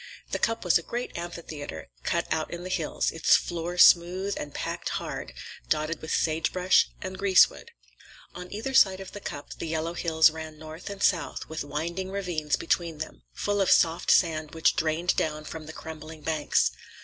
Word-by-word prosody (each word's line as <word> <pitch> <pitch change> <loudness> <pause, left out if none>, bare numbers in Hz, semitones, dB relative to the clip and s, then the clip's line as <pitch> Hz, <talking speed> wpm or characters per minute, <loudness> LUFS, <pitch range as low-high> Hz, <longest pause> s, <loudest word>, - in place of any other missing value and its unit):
The - - -1
Cup 225 -3 0
was 175 -1 +5
a - - -7
great 240 +8 -5
amphitheater, 165 - -7
cut - - 0
out 155 - -2
in 175 0 -6
the 185 - -6
hills, 165 -4 0
its 165 - +4
floor 175 +1 -2
smooth 180 +3 +5
and 145 - -5
packed - - -4
hard, - - -5 0.4
dotted 155 +2 0
with 160 - -6
sagebrush 170 +3 +2
and 185 0 -6
greasewood. 195 -2 +4 0.6
On 180 0 -9
either 225 +6 -4
side 190 -6 +5
of 190 -1 -8
the 205 - -8
Cup 145 -7 -7
the - - -4
yellow 160 +1 -2
hills 160 -2 +4
ran 160 -1 -8
north 155 +3 -9
and 200 0 -5
south, 170 -4 +1
with 160 -2 -4
winding 170 +6 -3
ravines 175 -6 -1
between 165 -1 -1
them, 150 - -7
full 205 0 0
of 195 - +2
soft 165 0 +3
sand 160 -3 +3
which 160 - +3
drained 160 +3 +1
down 155 -1 -1
from 155 0 -8
the - - -6
crumbling 160 0 -9
banks. 155 -1 +1
165 Hz, 180 wpm, -27 LUFS, 155-185 Hz, 0.6 s, was